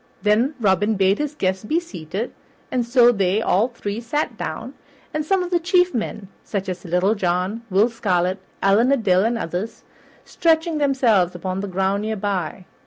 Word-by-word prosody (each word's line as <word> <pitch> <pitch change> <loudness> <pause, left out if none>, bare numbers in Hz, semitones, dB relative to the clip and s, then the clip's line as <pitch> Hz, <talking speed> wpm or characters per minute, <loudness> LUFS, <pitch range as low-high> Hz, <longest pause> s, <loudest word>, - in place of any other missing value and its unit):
Then 225 +8 +2
Robin 205 0 +2
bade 195 +1 +2
his 300 0 -3
guests 190 -6 -1
be 315 +10 +1
seated, 195 - -6 0.4
and 250 -1 +1
so 240 0 +6
they 195 -2 +1
all 220 0 +2
three 230 -3 -5
sat 295 +6 -2
down, - - -5 0.5
some 365 +4 +1
of 355 - -6
the 350 - +3
chief 360 +1 +2
men, 215 -4 -4 0.2
such 200 -2 -4
as 180 -1 -5
Little 180 +3 +1
John, 185 +2 -1
Will 200 +4 +4
Scarlet, 190 -5 0 0.2
Allan 210 +7 +4
a 275 - +4
Dale, 190 -4 +2
and 230 +1 0
others, 180 +3 -4 0.4
stretching 320 -1 +1
themselves 235 -11 +2
upon 185 +1 -3
the 200 - -3
ground 190 +2 0
near 220 +1 -2
by. 190 -3 -3
210 Hz, 175 wpm, -22 LUFS, 190-250 Hz, 0.5 s, so